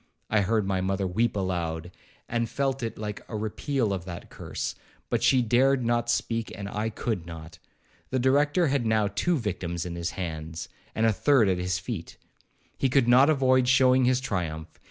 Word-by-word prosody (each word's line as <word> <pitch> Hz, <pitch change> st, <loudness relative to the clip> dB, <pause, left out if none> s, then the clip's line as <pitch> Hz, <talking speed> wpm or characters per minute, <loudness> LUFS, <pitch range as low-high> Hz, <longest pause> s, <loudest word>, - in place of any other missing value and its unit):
I 110 Hz, -1 st, +4 dB
heard 105 Hz, +1 st, +1 dB
my 95 Hz, -1 st, 0 dB
mother 95 Hz, +1 st, -1 dB
weep 110 Hz, +6 st, 0 dB
aloud, 85 Hz, -3 st, -2 dB, 0.4 s
and 115 Hz, -1 st, -1 dB
felt 135 Hz, 0 st, -1 dB
it 115 Hz, -2 st, -4 dB
like 105 Hz, -1 st, -5 dB
a 110 Hz, -, -3 dB
repeal 110 Hz, +1 st, -1 dB
of 95 Hz, -3 st, -3 dB
that 90 Hz, -2 st, -8 dB
curse; -, -, -4 dB, 0.4 s
but -, -, +1 dB
she 130 Hz, -2 st, +4 dB
dared 125 Hz, +2 st, +3 dB
not 120 Hz, 0 st, +1 dB
speak, 115 Hz, -1 st, -1 dB
and 100 Hz, -1 st, -5 dB
I 105 Hz, +2 st, -2 dB
could 105 Hz, -5 st, -3 dB
not. 80 Hz, 0 st, -9 dB, 0.5 s
The 130 Hz, -, 0 dB
Director 145 Hz, +7 st, +3 dB
had 135 Hz, -2 st, +1 dB
now 110 Hz, -2 st, +2 dB
two 165 Hz, -, 0 dB
victims 90 Hz, -, -3 dB
in 90 Hz, -, -5 dB
his 85 Hz, 0 st, -2 dB
hands, 80 Hz, -2 st, -5 dB, 0.3 s
and 110 Hz, -, +2 dB
the 110 Hz, -, +4 dB
third 120 Hz, +2 st, +4 dB
at 90 Hz, -1 st, +1 dB
his 90 Hz, +1 st, -1 dB
feet. 95 Hz, -2 st, -6 dB, 0.6 s
He 135 Hz, -, +2 dB
could 125 Hz, -1 st, +3 dB
not 130 Hz, +4 st, +6 dB
avoid 130 Hz, -4 st, +3 dB
showing 130 Hz, 0 st, +5 dB
his 125 Hz, 0 st, +3 dB
triumph. 85 Hz, -9 st, -3 dB
110 Hz, 185 wpm, -27 LUFS, 90-130 Hz, 0.6 s, not